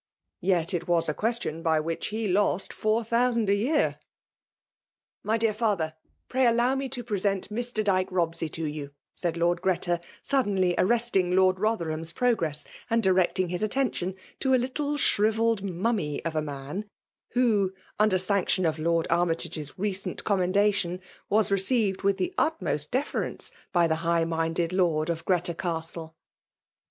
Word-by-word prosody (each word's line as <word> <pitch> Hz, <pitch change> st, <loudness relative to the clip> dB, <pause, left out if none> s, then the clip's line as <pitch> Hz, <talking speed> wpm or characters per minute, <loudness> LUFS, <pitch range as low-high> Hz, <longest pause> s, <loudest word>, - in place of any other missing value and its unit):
Tet 180 Hz, -1 st, +1 dB
it 175 Hz, -1 st, -2 dB
lK>MINATK>N;i 175 Hz, -1 st, +3 dB
It 165 Hz, -, +1 dB
a -, -, +1 dB
qntation 220 Hz, -6 st, -2 dB
by 160 Hz, -2 st, +2 dB
which 165 Hz, +1 st, -2 dB
he 220 Hz, +1 st, -2 dB
lost 195 Hz, 0 st, +1 dB
four 215 Hz, +2 st, +1 dB
tlio«9iHui 235 Hz, +1 st, +1 dB
'f -, -, -10 dB, 1.2 s
My 220 Hz, +2 st, +1 dB
dear 225 Hz, -1 st, +2 dB
falher^ 205 Hz, -8 st, 0 dB, 0.3 s
pray 260 Hz, 0 st, +2 dB
aUow 240 Hz, +2 st, +3 dB
me 270 Hz, 0 st, -2 dB
to 250 Hz, -2 st, -3 dB
{ureseat 200 Hz, -4 st, -1 dB
Mr. 235 Hz, 0 st, -1 dB
Dyke 190 Hz, -2 st, +1 dB
Bobseyto 165 Hz, -3 st, -1 dB
you," 145 Hz, -2 st, -6 dB, 0.2 s
said 170 Hz, -2 st, -2 dB
Lord 170 Hz, +1 st, +1 dB
Giretat 175 Hz, -2 st, +1 dB, 0.3 s
gaddenly 200 Hz, -10 st, +2 dB
arre&tiDg 195 Hz, -4 st, +2 dB
Lord 185 Hz, 0 st, +4 dB
Botherham's 170 Hz, -6 st, -1 dB
pro 245 Hz, -1 st, +2 dB
gvtttiy 155 Hz, -6 st, -2 dB, 0.2 s
and 230 Hz, -1 st, +2 dB
direeting 185 Hz, -1 st, +2 dB
his 180 Hz, +2 st, -2 dB
attention 215 Hz, -5 st, 0 dB, 0.2 s
to 265 Hz, -1 st, +3 dB
a -, -, +5 dB
little 285 Hz, +4 st, -2 dB
shrivelled 225 Hz, -3 st, +2 dB
mummy 190 Hz, -5 st, -2 dB
of 165 Hz, -1 st, -2 dB
a 155 Hz, -, +1 dB
man, 145 Hz, +8 st, -6 dB, 0.4 s
who, 220 Hz, -6 st, +2 dB, 0.3 s
under 210 Hz, -3 st, +4 dB
sane* 190 Hz, 0 st, +1 dB
tioiat 185 Hz, -, +1 dB
of 155 Hz, 0 st, -5 dB
Lord 165 Hz, +1 st, +1 dB
Army 170 Hz, 0 st, +3 dB
tage^s 155 Hz, -3 st, -4 dB
recent 195 Hz, 0 st, -2 dB
commendation, 195 Hz, -1 st, +1 dB, 0.3 s
was 215 Hz, +1 st, +3 dB
reeeived 195 Hz, 0 st, +2 dB
with 195 Hz, 0 st, +2 dB
the 360 Hz, -, -2 dB
utmost 155 Hz, -, -1 dB
deference 265 Hz, +4 st, -2 dB, 0.2 s
by 175 Hz, -2 st, +4 dB
the 160 Hz, -1 st, 0 dB
Ugh 165 Hz, -1 st, +2 dB
minded 165 Hz, +1 st, -1 dB
Lord 170 Hz, -3 st, +2 dB
of 165 Hz, 0 st, -4 dB
Greta 180 Hz, -1 st, +1 dB
Castle. 165 Hz, -1 st, -5 dB
190 Hz, 155 wpm, -27 LUFS, 170-220 Hz, 1.2 s, a